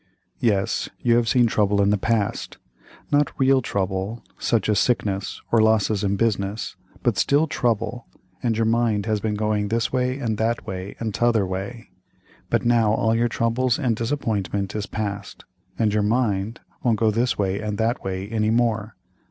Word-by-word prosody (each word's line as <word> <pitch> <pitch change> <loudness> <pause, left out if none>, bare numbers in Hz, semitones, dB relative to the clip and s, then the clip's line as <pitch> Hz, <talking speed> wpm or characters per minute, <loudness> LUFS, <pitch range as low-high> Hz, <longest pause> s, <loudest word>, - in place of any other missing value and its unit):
"Yes, 105 -2 +1
you 120 -1 +3
have 120 -1 +1
seen 125 0 +4
trouble 105 -2 +2
in 100 0 +4
the - - +4
past, 110 -1 -1 0.5
not 145 0 +2
real 135 0 +4
trouble, 100 +1 -2 0.2
such 115 -5 +1
as 105 -3 +3
sickness, 100 -5 0
or 115 - +5
losses 110 -2 +2
in 100 0 +1
business, 100 -1 -1 0.3
but - - +1
still, 145 +3 +3
trouble, 115 -4 -1 0.3
and 115 -3 0
your 115 - +2
mind 115 -3 +1
has 110 -2 0
been 105 0 -1
going 105 -1 0
this 115 +4 -1
way 130 0 0
and 115 -6 -2
that 115 +1 0
way 95 +1 -6
and 110 -2 -3
t'other 115 -3 +2
way, 100 +6 -6 0.6
but - - +1
now 115 -3 +4
all 110 +1 +2
your 120 +1 +2
trouble 115 +3 0
and 125 -6 +1
disappointment 105 -5 -2
is 105 -2 -3
past, 100 -3 -5 0.3
and 110 -2 +1
your 105 - +2
mind 110 -1 0 0.2
won't 115 -3 +2
go 110 -1 +3
this 120 +3 0
way 100 -1 0
and 105 -1 -3
that 115 +3 0
way 95 0 -3
any 110 0 0
more. 115 -2 0
110 Hz, 175 wpm, -23 LUFS, 100-120 Hz, 0.6 s, or